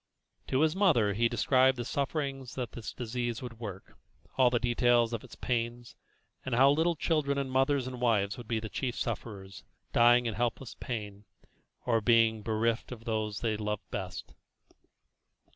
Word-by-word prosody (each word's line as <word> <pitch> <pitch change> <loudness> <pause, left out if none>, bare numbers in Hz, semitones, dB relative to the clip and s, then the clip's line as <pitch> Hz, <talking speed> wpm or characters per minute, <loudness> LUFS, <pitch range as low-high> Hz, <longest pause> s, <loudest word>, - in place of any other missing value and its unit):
To 130 - +1
his 160 +1 +3
mother 150 - +3
he 115 +3 +2
described 130 +2 +3
the 120 - -4
sufferings 140 -2 -3
that 125 -3 -4
this 115 - -7
disease 120 -1 -4
would 115 -2 -8
work, 100 -5 -8 0.4
all 130 -2 +5
the 120 - +1
details 120 -1 +2
of 115 - -3
its - - -12
pains, 120 0 -3 0.5
and 130 -2 -2
how 135 +3 +6
little 165 +3 +2
children 150 -3 0
and 135 -1 -2
mothers 135 0 +2
and 130 -1 -6
wives 105 -5 +2
would 120 -3 -10
be 115 -1 0
the 110 - -5
chief 120 +5 -3
sufferers, 100 -6 -5 0.3
dying 120 +1 +5
in 115 - -1
helpless 120 +2 -2
pain, 105 -5 -6 0.6
or 115 -2 +2
being 115 -1 +4
bereft 110 +2 -1
of 115 -2 -9
those 110 -2 -2
they 110 -2 0
loved 105 -1 -4
best. 95 -2 -6
120 Hz, 165 wpm, -30 LUFS, 110-130 Hz, 0.6 s, how